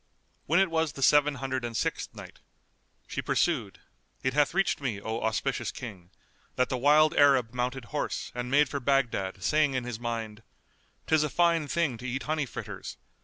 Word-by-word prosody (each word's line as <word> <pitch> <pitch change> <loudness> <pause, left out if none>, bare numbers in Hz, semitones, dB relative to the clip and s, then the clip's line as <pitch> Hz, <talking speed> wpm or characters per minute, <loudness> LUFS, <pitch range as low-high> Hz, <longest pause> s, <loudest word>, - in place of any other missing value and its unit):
When 170 +4 +4
it 190 -3 +2
was 160 -2 0
the 135 - -4
Seven 145 +1 +5
Hundred 130 -1 -3
and 115 -2 -3
Sixth - - -2
Night, - - -11 0.7
She - - -4
pursued, - - 0 0.5
It 130 - 0
hath 150 +3 +2
reached 195 -5 +1
me, 120 -7 -2
O 110 +3 -4
auspicious 115 +1 -1
King, 95 -9 -9 0.5
that 125 - +1
the 130 - -1
wild 150 +3 +5
Arab 135 -5 +4
mounted 125 0 -2
horse 150 - -3
and 125 0 -4
made 145 +2 +4
for 140 +2 -3
Baghdad 120 -8 0
saying 150 -3 +2
in 130 - -1
his 120 -2 -5
mind, 115 -2 -4 0.6
"'Tis 155 -1 +3
a 150 - -1
fine 170 -1 +2
thing 145 -8 0
to 130 - -6
eat 130 +2 -3
honey 155 -2 -1
fritters! - - -7
135 Hz, 180 wpm, -28 LUFS, 120-150 Hz, 0.7 s, Seven